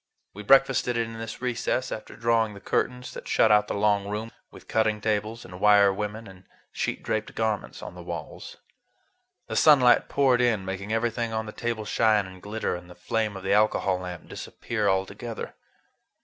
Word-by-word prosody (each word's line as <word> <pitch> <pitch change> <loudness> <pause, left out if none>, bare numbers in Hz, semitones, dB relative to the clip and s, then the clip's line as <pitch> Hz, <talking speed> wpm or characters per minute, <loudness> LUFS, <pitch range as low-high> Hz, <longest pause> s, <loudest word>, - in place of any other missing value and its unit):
We 105 - -8
breakfasted 135 +1 +4
in 115 -1 -3
this 115 +2 -7
recess, 125 +1 -1
after 110 - -7
drawing 115 -2 +1
the - - -10
curtains 125 +4 -2
that - - -9
shut 110 - +4
out 105 0 +5
the - - -3
long 100 -1 +2
room, 105 +3 -4 0.2
with - - -15
cutting 110 -1 +1
tables 110 +2 -2
and 90 0 -10
wire 100 -1 +6
women 105 +3 -4
and 95 -2 -14 0.3
sheet - - -3
draped 110 0 -2
garments 110 -2 -2
on - - -7
the - - -10
walls. - - -7 0.9
The - - -5
sunlight 135 -6 +5
poured 130 -3 +3
in, 110 -6 +1
making 95 +2 -5
everything 115 0 -1
on 110 0 -2
the 105 - -7
table 115 -1 -3
shine 105 -1 +2
and 95 -1 -12
glitter 105 -2 -3
and 90 0 -10
the 90 - -12
flame 110 -3 -2
of 95 - -9
the 95 - +1
alcohol 100 -3 +2
lamp 90 -2 -7
disappear 110 -3 -3
altogether. 100 +4 -3
110 Hz, 180 wpm, -26 LUFS, 100-115 Hz, 0.9 s, wire